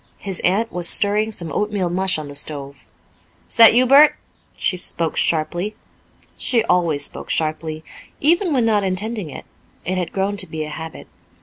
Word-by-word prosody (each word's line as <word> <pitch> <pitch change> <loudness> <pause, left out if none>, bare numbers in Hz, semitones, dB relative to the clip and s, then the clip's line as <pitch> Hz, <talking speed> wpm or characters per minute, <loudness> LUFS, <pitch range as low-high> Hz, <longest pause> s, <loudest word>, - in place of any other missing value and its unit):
His 190 -3 -4
aunt 210 +6 0
was 175 -1 +2
stirring 210 +2 +2
some 170 -6 -3
oatmeal 205 +2 -2
mush 190 0 +1
on 155 -1 -6
the 145 - -9
stove. 140 -1 -4 0.6
"Is - - -11
that 230 -1 +8
you, 250 +1 +5
Bert?" 280 +4 +6 0.4
She 185 - -1
spoke 170 -2 -1
sharply. 175 +6 -1 0.6
She 235 -3 0
always 170 -7 +1
spoke - - -5
sharply, 155 0 -2 0.4
even 340 +4 +2
when 255 -5 +1
not 210 -3 +1
intending 195 0 -3
it; - - -10 0.4
it 185 +2 -2
had 175 -2 -4
grown 200 +1 -2
to 185 - +2
be 160 -1 -5
a 155 - -7
habit. 160 +1 -8
185 Hz, 175 wpm, -19 LUFS, 160-215 Hz, 0.6 s, that